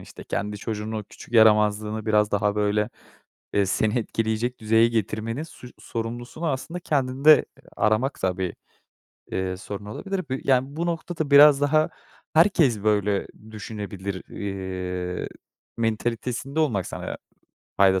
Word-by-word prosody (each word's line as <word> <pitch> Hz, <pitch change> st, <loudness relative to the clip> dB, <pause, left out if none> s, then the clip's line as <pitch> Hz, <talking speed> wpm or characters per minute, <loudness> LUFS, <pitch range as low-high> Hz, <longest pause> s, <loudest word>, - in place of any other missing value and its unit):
işte, -, -, -12 dB
kendi 105 Hz, +1 st, -3 dB
çocuğunun 110 Hz, +1 st, -4 dB
o 105 Hz, -, -6 dB
küçük 120 Hz, -, -13 dB
yaramazlığını 105 Hz, -1 st, +4 dB
biraz 105 Hz, -1 st, +3 dB
daha, 105 Hz, 0 st, +1 dB
böyle, 105 Hz, +1 st, +1 dB, 0.6 s
eee, 100 Hz, -1 st, +3 dB
seni 110 Hz, +5 st, +1 dB
etkileyecek 115 Hz, +2 st, -1 dB
düzeye 110 Hz, +1 st, +4 dB
getirmenin 115 Hz, +3 st, -2 dB
suç 125 Hz, -6 st, -11 dB
sorumlusunu 120 Hz, +7 st, -5 dB
aslında 155 Hz, +5 st, -3 dB
kendinde 140 Hz, 0 st, +4 dB, 0.3 s
aramak 110 Hz, +6 st, +1 dB
da 90 Hz, -1 st, 0 dB
bir, 95 Hz, -2 st, -2 dB, 0.8 s
eee, 95 Hz, 0 st, -2 dB
sorun 100 Hz, +1 st, -7 dB
olabilir. 195 Hz, -, -4 dB
Bu -, -, -1 dB
Yani, 135 Hz, +1 st, +2 dB
bu 170 Hz, -, -1 dB
noktada 165 Hz, -3 st, -3 dB
biraz 145 Hz, 0 st, +8 dB
daha 155 Hz, +2 st, +3 dB, 0.4 s
"Herkes 155 Hz, -, +4 dB
böyle 105 Hz, -2 st, +1 dB, 0.2 s
düşünebilir." 100 Hz, -3 st, -6 dB
eee, 90 Hz, -2 st, -4 dB, 0.5 s
mentalitesinde 120 Hz, +5 st, -2 dB
olmak 115 Hz, -, +1 dB
sana -, -, -5 dB, 0.6 s
fayda 95 Hz, -1 st, +5 dB
110 Hz, 125 wpm, -25 LUFS, 105-135 Hz, 0.8 s, biraz